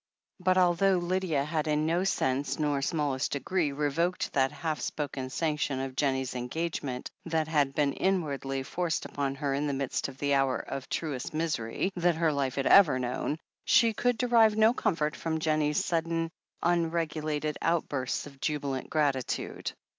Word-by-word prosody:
But 185 0 +2
although 185 +1 +4
Lydia 175 -5 0
had 155 0 -1
in 150 0 +1
no 170 +3 +1
sense 135 -7 0
nor 145 -2 0
smallest 145 -2 -1
degree 155 +2 0
revoked 150 +5 -1
that 135 -1 +2
half 155 -3 -3
spoken 140 -3 -3
sanction 150 -2 -1
of 135 -1 -4
Jennie's 130 -2 0
engagement, 130 0 -3
that 160 -2 0
had 145 -4 +1
been 145 -2 +2
inwardly 140 -8 -1
forced 170 +3 -2
upon 140 -1 -2
her 140 -1 -1
in 145 +2 0
the 140 - -1
midst 135 -1 -2
of 130 - -10
the 140 0 0
hour 135 -2 +2
of 135 - -6
truest* 150 -2 -3
misery 155 - -1
that 175 -1 +2
her 160 -1 +2
life 135 -2 -1
had 135 - -1
ever 165 -10 +7
known, 125 +4 -2 0.3
she 230 -1 +4
could 245 +2 +1
derive 230 -3 +4
no 220 +2 +5
comfort 155 -9 0
from 160 -1 -2
Jennie's 155 -1 +1
sudden, 165 0 -1 0.3
unregulated 160 -3 0
outbursts 145 -6 -1
of 140 -2 -13
jubilant 140 -3 -2
gi; - - -3
atitude. 140 -4 -1
150 Hz, 160 wpm, -29 LUFS, 140-170 Hz, 0.3 s, ever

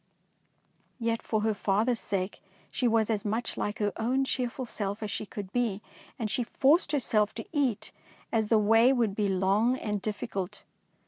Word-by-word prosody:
Yet 230 -1 0
for 215 -1 -1
her 220 0 +1
father's 215 +4 +1
sake 190 0 -3 0.3
she 250 - +1
was 225 -1 +2
as 210 -2 -1
much 220 +2 -1
like 205 - -2
her 205 -1 0
own 255 +4 +1
cheerful 255 0 -2
self 205 -2 -4
as 210 - -3
she 215 - -3
could 200 -2 -7
be, 225 -5 0 0.3
and 225 -4 -2
she 240 +4 0
forced 285 +7 +3
herself 220 -7 +1
to 225 - -5
eat, 250 -9 0 0.4
as 220 -2 +1
the 225 - +4
way 225 +4 +5
would 235 -6 +1
be 205 -2 +1
long 195 +6 +2
and 210 -4 -3
difficult. 205 -2 -4
220 Hz, 175 wpm, -29 LUFS, 205-240 Hz, 0.4 s, way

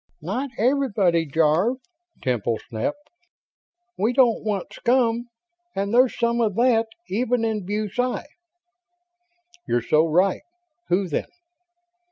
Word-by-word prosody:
"Not 245 - -2
everybody, 210 - +2
Jarve!" 160 - +2 0.5
Temple 120 -3 0
snapped. 205 - -3 0.9
"We 220 +5 +2
don't 250 -3 +3
want 205 -3 -3
scum, 240 -1 +1 0.5
and 200 +2 -2
there's 250 +1 +4
some 235 0 +1
of 210 -4 +1
that, 230 -1 +3 0.2
even 240 +2 0
in 215 -4 -2
BuSci." 215 +5 -1 1.4
"You're 120 -1 +1
so 155 +6 +3
right. 180 +4 +2 0.5
Who, 185 +2 +2
then?" 155 - -2
215 Hz, 110 wpm, -23 LUFS, 175-245 Hz, 1.4 s, there's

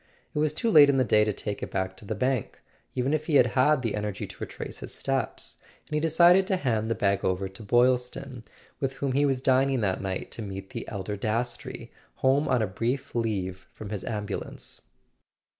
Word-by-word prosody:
It - - -1
was 155 -1 +2
too 230 - 0
late 145 -5 +8
in 140 - +3
the 130 - +4
day 105 -3 +4
to 105 - +1
take 105 0 -5
it - - -4
back 95 0 -2
to 105 - -13
the 110 - -3
bank, 125 +1 -1 0.4
even 130 +3 0
if 155 0 -1
he 155 - +1
had 130 - +7
had 140 +1 +3
the 115 - 0
energy 105 -2 -3
to - - -11
retrace - - -6
his - - -8
steps; - - -3 0.3
and - - -11
he 150 - +2
decided 175 +4 +5
to 190 - +1
hand 110 -8 0
the 115 - +1
bag 100 0 +1
over 95 +1 0
to 95 +3 -12
Boylston, 125 +2 +1 0.4
with 135 -1 -1
whom 135 0 -2
he 140 +2 +3
was 135 -2 0
dining 135 -1 +3
that 95 -3 0
night 95 -1 -4
to - - -7
meet 95 -2 -7
the - - -6
elder 100 0 -4
Dastrey, 115 +4 -3 0.2
home 135 +3 +2
on 125 -4 +2
a - - +2
brief 120 +8 -2
leave 95 -6 -2
from 105 -1 -9
his 105 -3 -4
ambulance. 105 -2 -5
120 Hz, 210 wpm, -27 LUFS, 105-135 Hz, 0.4 s, late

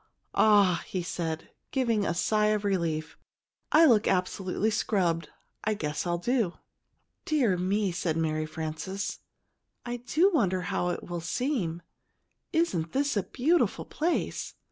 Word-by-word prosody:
"Ah," 205 -5 +4
he 185 -2 -3
said, 165 -2 -4 0.2
giving 230 -6 +1
a 170 - 0
sigh 210 +4 +2
of 210 -1 +1
relief. 165 -5 -1 0.5
"I 325 +2 +7
look 230 -8 +5
absolutely 190 +3 0
scrubbed; 180 -7 0 0.3
I 215 0 +1
guess 150 -1 -3
I'll 175 0 +1
do!" 225 -1 0 0.7
"Dear 260 -11 +2
me!" 190 +2 0
said 170 -2 -1
Mary 155 -1 0
Frances. 160 +5 -4 0.7
"I 240 0 -3
do 305 +11 +2
wonder 190 - +2
how 180 -1 -1
it 175 - -3
will 175 -1 -5
seem. 175 - -2 0.7
Isn't 185 - 0
this 280 -1 +1
a 200 - +2
beautiful 310 - +1
place? 335 +3 -2
195 Hz, 135 wpm, -28 LUFS, 170-235 Hz, 0.7 s, I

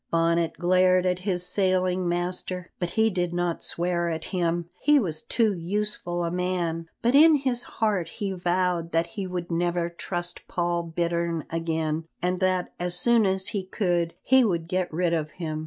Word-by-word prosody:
Bonnet 165 0 +2
glared 185 +1 +3
at 180 0 +1
his 180 -2 0
sailing 185 -1 +1
master, 180 +1 -3
but 175 - -1
he 220 +5 +2
did 175 -2 -1
not 175 -1 -1
swear 175 0 +1
at 160 -1 -4
him, 170 -2 0
he 295 +1 +4
was 165 - -1
too 225 +2 +1
useful 175 -1 -2
a 170 - -1
man, 175 -2 -2
but 240 +2 +3
in 310 +2 +8
his 260 -4 0
heart 210 -8 -1
he 200 +2 -4
vowed 175 -2 0
that 165 +1 +2
he 190 +2 -5
would 180 -1 -4
never 170 0 0
trust 175 0 -5
Paul 175 -1 0
Bittern 170 -1 -2
again, 160 -1 -1
and 180 0 -1
that 185 -1 0
as 175 0 -1
soon 230 +1 +4
as 190 +1 0
he 205 -2 -2
could 175 -3 -1
he 260 0 +5
would 170 -7 0
get 185 0 -1
rid 170 +1 0
of 155 -2 -1
him. 155 -3 -4
175 Hz, 175 wpm, -26 LUFS, 170-185 Hz, -, in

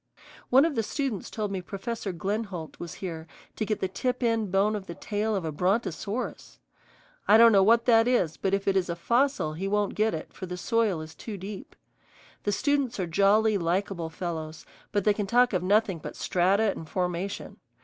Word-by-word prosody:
One 265 +4 +6
of 330 - 0
the 230 - +1
students 250 -2 -3
told 210 -2 -3
me 190 -2 -3
Professor 200 +3 -5
Glenholdt 190 -2 -4
was 170 -2 -7
here 165 -2 -6 0.3
to 215 - -2
get 215 - -1
the 190 - +1
tip 250 +7 -2
end 225 -4 +1
bone 200 +3 +2
of 200 -2 -6
the 170 - -6
tail 210 +1 -2
of 190 -4 -2
a 160 - -2
brontosaurus. 200 - -2 0.7
I 210 - +7
don't 230 0 +8
know 200 -2 +6
what 230 +4 +4
that 230 -1 +5
is, 185 -11 +2
but 195 0 0
if 195 0 -4
it 195 - +3
is 185 -2 +1
a 170 - -1
fossil 235 - +1
he 185 +5 -3
won't 205 0 0
get 215 -3 +1
it, 155 - -8
for 185 - -7
the 180 0 -5
soil 215 -4 +1
is 155 0 -9
too 215 -3 -7
deep. 200 - -8 0.7
The 205 - +2
students 275 0 0
are 185 - 0
jolly, 200 +4 +3
likable 175 0 -1
fellows, 160 -2 -5 0.3
but 205 -2 +1
they 210 - +4
can 205 -1 -3
talk 245 +2 +4
of 180 - +1
nothing 195 -1 +2
but - - -8
strata 195 +4 +2
and 160 -4 -8
formation. 180 +1 -3
200 Hz, 200 wpm, -27 LUFS, 180-225 Hz, 0.7 s, don't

